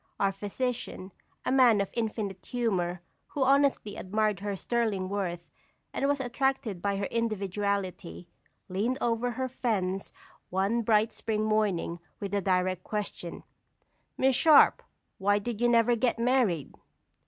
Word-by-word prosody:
Our 195 -1 +2
physician, 205 -1 -4 0.3
a - - +1
man 250 -5 +5
of 200 - -1
infinite 215 -4 -3
humor, 185 -8 -1 0.2
who 280 - -1
honestly 275 -6 +2
admired 210 +2 0
her 200 0 -3
sterling 210 -3 -1
worth, 175 -4 -3 0.5
and 275 - 0
was 285 0 +1
attracted 255 -6 -1
by 200 +1 0
her 200 - -1
individuality, 200 - -2 0.4
leaned 215 +8 -1
over 235 +1 0
her 260 +2 -2
fence 195 -7 -2 0.4
one 195 +6 +1
bright 220 0 +2
spring 215 -1 -2
morning, 205 -6 0 0.2
with 200 -2 -4
the 200 0 0
direct 185 -1 0
question: 205 -5 -5 0.7
"Miss 265 0 +3
Sharp, 310 +2 +6 0.4
why 205 +1 +3
did 220 +2 -4
you 240 - +4
never 235 0 +4
get 235 +1 +1
married?" 230 - +1
210 Hz, 135 wpm, -29 LUFS, 190-240 Hz, 0.7 s, Sharp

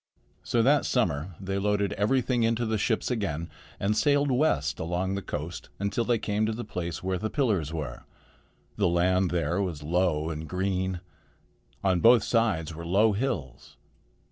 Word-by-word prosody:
So 115 -1 +1
that 140 +3 +4
summer 85 - 0
they 95 0 -2
loaded 100 0 +1
everything 125 +3 +1
into 115 +1 +1
the 110 -1 0
ships 110 +3 0
again 85 -9 -2 0.3
and 105 +2 +1
sailed 145 +2 +3
west 75 - +1
along 90 +3 -1
the 100 - -2
coast 80 0 -6
until 100 +4 -1
they 120 0 +2
came 105 0 -1
to - - 0
the 115 +1 -5
place 85 -6 -5
where 95 -1 -1
the 110 - -2
pillars 105 - 0
were. 75 -6 -5 0.8
The 100 - +3
land 90 +2 +2
there 85 +2 0
was 85 -7 -3
low 80 -1 +1
and 80 0 -6
green. 95 -1 -1 0.8
On 95 -2 +2
both 115 +2 +6
sides 100 -9 +1
were 85 +2 -7
low 100 +6 +3
hills. 100 - -4
95 Hz, 165 wpm, -27 LUFS, 85-110 Hz, 0.8 s, both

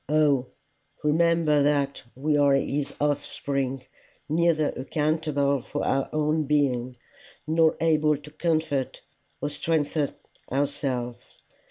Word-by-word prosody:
O 145 -4 +3 0.6
remember 160 -1 +3
that 140 -1 +1
we 150 +3 0
are 140 -1 +4
his 140 +1 -1
offspring, 140 -2 -2 0.4
neither 160 -1 +2
accountable 145 -1 0
for - - -4
our 135 0 0
own 155 0 +1
being, 130 -4 0 0.5
nor 160 0 +3
able 155 -2 +3
to 150 +1 -13
comfort 155 -4 -1 0.4
or 145 - -2
strengthen 150 -1 -1 0.4
ourselves. 130 -3 -3
145 Hz, 105 wpm, -26 LUFS, 140-155 Hz, 0.6 s, are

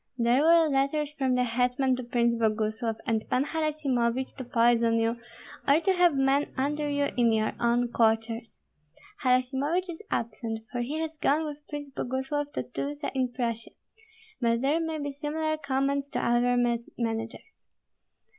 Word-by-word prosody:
There 240 +3 +3
were 330 +1 +5
letters 285 +1 0
from 265 -4 0
the 250 - +2
hetman 250 +2 +1
to 255 - -5
Prince 235 0 +1
Boguslav 220 0 0
and 225 -2 0
Pan 255 +2 +2
Harasimovich 275 -6 -1
to 260 - -5
poison 235 -1 +3
you, 230 +1 +1 0.5
or 280 +3 +5
to 380 +3 +2
have 355 -4 +4
men 270 +2 +2
under 295 +2 -1
you 285 0 +1
in 235 -2 +3
your 215 -1 +1
own 240 +1 +2
quarters. 225 -1 0 0.6
Harasimovich 270 +8 +1
is 325 - -9
absent, 225 0 -3
for 245 - -2
he 275 +6 -3
has 320 -1 -5
gone 305 +3 +2
with 295 -1 -6
Prince 290 -2 -6
Boguslav 270 +3 -2
to - - -2
Tyltsa 285 +4 -4
in 260 -2 0
Prussia; 230 -2 -3 0.7
but 230 -1 +1
there 285 +5 +2
may 325 -1 -2
be 285 -1 -3
similar 310 +2 -2
commands 280 -1 -1
to - - -2
other 245 +1 +2 0.4
managers. 225 - -5
260 Hz, 155 wpm, -28 LUFS, 235-290 Hz, 0.7 s, were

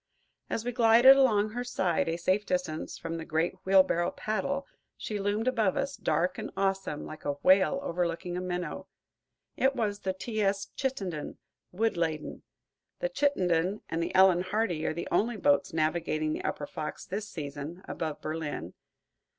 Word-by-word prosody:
As 225 - -2
we 245 - -1
glided 240 +2 +7
along 215 -6 +3
her 245 +2 -3
side, 185 -9 0
a 165 - -1
safe 185 +4 +1
distance 180 -5 -2
from 165 0 -5
the 165 - -5
great 160 +1 0
wheelbarrow 185 -3 +4
paddle, 275 +7 -2 0.3
she 210 -1 -4
loomed 205 +4 -1
above 225 -7 +2
us, 275 0 -1
dark 175 +4 0
and - - -5
awesome, 195 -6 -1
like 155 - -9
a 145 - 0
whale 190 +9 +5
overlooking 175 -3 -2
a 180 - -2
minnow. 180 -1 -4 0.7
It 270 +1 +2
was 210 -4 -1
the 190 -2 -2
"T. 215 +3 -3
S. 200 0 0
Chittenden," 195 - -3 0.3
wood 220 +1 0
laden. 160 -2 -2 0.6
The - - -1
"Chittenden" 190 - +1
and 165 - -1
the 170 - -3
"Ellen 185 -2 +6
Hardy" 185 -4 -1
are - - 0
the 170 - -4
only 220 +5 +1
boats 145 -7 +2
navigating 155 -1 0
the - - -4
upper 145 - -2
Fox 150 +1 -6
this 210 +3 -4
season, 150 +3 -6
above 155 -3 -4
Berlin. 155 - -4
185 Hz, 165 wpm, -29 LUFS, 165-215 Hz, 0.7 s, glided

